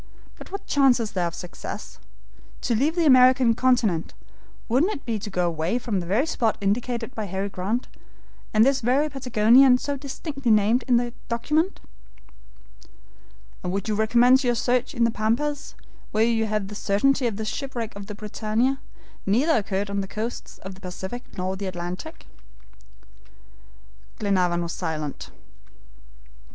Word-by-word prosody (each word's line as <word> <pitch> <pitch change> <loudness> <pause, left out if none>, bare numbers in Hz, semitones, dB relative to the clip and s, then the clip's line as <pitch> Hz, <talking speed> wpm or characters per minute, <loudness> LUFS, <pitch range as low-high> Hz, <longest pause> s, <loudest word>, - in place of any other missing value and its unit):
But - - -12
what 395 - -6
chance 270 -3 +4
is 220 -2 -3
there 180 -2 0
of 170 - -6
success? 180 -1 -8 0.6
To 240 - 0
leave 285 +9 +1
the 340 -2 +2
American 255 -3 +6
continent, 225 -9 +1 0.5
wouldn't 295 - +2
it - - -9
be 225 -3 -2
to 210 - -6
go 180 -2 0
away 165 +5 0
from 230 -5 -2
the 170 - -5
very 215 - +2
spot 230 -8 0
indicated 235 +4 -1
by 220 -5 -4
Harry 195 +1 -3
Grant, 200 +6 -2 0.6
from 215 0 +5
this 270 +1 +3
very 265 +6 +2
Patagonia 250 -1 +5
so 280 +2 -3
distinctly 275 -1 -4
named 215 +3 +4
in 245 -2 +4
the 240 0 -1 0.2
document." 300 +10 0 1.8
"And 180 - -2
would 195 +3 -2
you 215 - 0
recommence 240 +5 +4
your 240 -1 +2
search 250 +4 0
in 235 - +2
the 230 - +3
Pampas, 245 +7 -1 0.3
when 220 +2 +2
you 225 -1 +1
have 210 -2 -1
the - - -8
certainty 245 +7 +1
that 225 -4 -1
the 220 - -3
shipwreck 235 -1 -4
of 200 -1 -8
the 210 - -7
BRITANNIA 220 +5 -1 0.5
neither 270 +11 +3
occurred 200 -1 -1
on 200 0 -1
the 195 - -5
coasts 220 +4 -5
of 190 0 -7
the 190 - -16
Pacific 190 +6 -6
nor 185 +1 -2
the 195 0 -5
Atlantic?" 175 0 -6 1.9
Glenarvan 180 -4 +1
was 170 - -4
silent. 155 -3 -4
225 Hz, 160 wpm, -24 LUFS, 200-255 Hz, 1.9 s, American